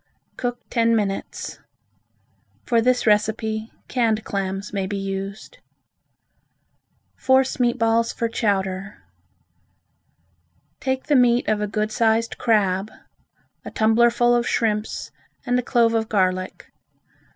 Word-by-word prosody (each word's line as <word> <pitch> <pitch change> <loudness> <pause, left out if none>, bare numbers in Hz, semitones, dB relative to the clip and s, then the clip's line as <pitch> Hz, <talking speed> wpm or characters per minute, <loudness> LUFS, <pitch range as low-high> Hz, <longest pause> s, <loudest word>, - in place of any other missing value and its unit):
Cook 245 -1 -3
ten 230 -1 +3
minutes. 200 -3 -3 1.1
For 235 -1 +2
this 250 +1 +2
recipe, 220 +1 +1 0.2
canned 225 -4 0
clams 195 0 -4
may 195 -2 -1
be 200 +1 -3
used. 195 - -6 1.6
Force 260 0 +2
Meat 240 -1 +2
Balls 230 0 +2
for 230 - -2
Chowder 195 -3 -2 1.8
Take 265 -2 -2
the 295 - +1
meat 245 -1 +3
of 215 -1 +1
a 210 - -1
good 215 +1 -2
sized 225 +1 +1
crab, 205 -3 +1 0.7
a - - -7
tumblerful 235 +2 +3
of 240 0 +1
shrimps 215 -1 -1 0.3
and 245 0 +1
a - - 0
clove 235 -2 +2
of 225 -1 0
garlic. 185 -2 -1
220 Hz, 115 wpm, -22 LUFS, 205-240 Hz, 1.8 s, ten